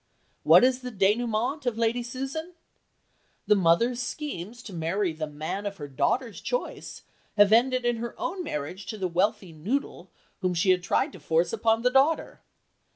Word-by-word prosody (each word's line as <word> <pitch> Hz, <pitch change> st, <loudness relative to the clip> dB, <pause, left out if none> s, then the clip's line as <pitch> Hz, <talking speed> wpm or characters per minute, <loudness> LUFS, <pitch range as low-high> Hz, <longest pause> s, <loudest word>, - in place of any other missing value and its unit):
What -, -, +7 dB
is 255 Hz, 0 st, +3 dB
the 250 Hz, -1 st, -7 dB
dénouement 230 Hz, +6 st, 0 dB
of 235 Hz, -2 st, 0 dB
Lady 230 Hz, +1 st, +1 dB
Susan? 270 Hz, +8 st, -5 dB, 0.9 s
The -, -, +5 dB
mother's 205 Hz, +7 st, +2 dB
schemes 245 Hz, -, -6 dB
to 200 Hz, -, -9 dB
marry 170 Hz, +2 st, -1 dB
the 155 Hz, 0 st, -4 dB
man 155 Hz, +7 st, -4 dB
of 200 Hz, -1 st, -6 dB
the 145 Hz, -, -7 dB
daughter's 225 Hz, -, -1 dB
choice -, -, -4 dB, 0.3 s
have 205 Hz, 0 st, +6 dB
ended 250 Hz, +2 st, +3 dB
in 240 Hz, -1 st, +1 dB
her 235 Hz, +1 st, -6 dB
own 365 Hz, +1 st, -3 dB
marriage 165 Hz, -, -5 dB
to 220 Hz, -, -5 dB
the 190 Hz, -2 st, -1 dB
wealthy 190 Hz, +2 st, 0 dB
noodle 200 Hz, -, -3 dB, 0.3 s
whom 180 Hz, -1 st, -1 dB
she 185 Hz, +3 st, +3 dB
had 180 Hz, -1 st, +2 dB
tried 265 Hz, -, 0 dB
to -, -, -11 dB
force 165 Hz, +2 st, +1 dB
upon 225 Hz, 0 st, +1 dB
the 250 Hz, -, +3 dB
daughter. 275 Hz, +5 st, +2 dB
220 Hz, 170 wpm, -27 LUFS, 180-250 Hz, 0.9 s, What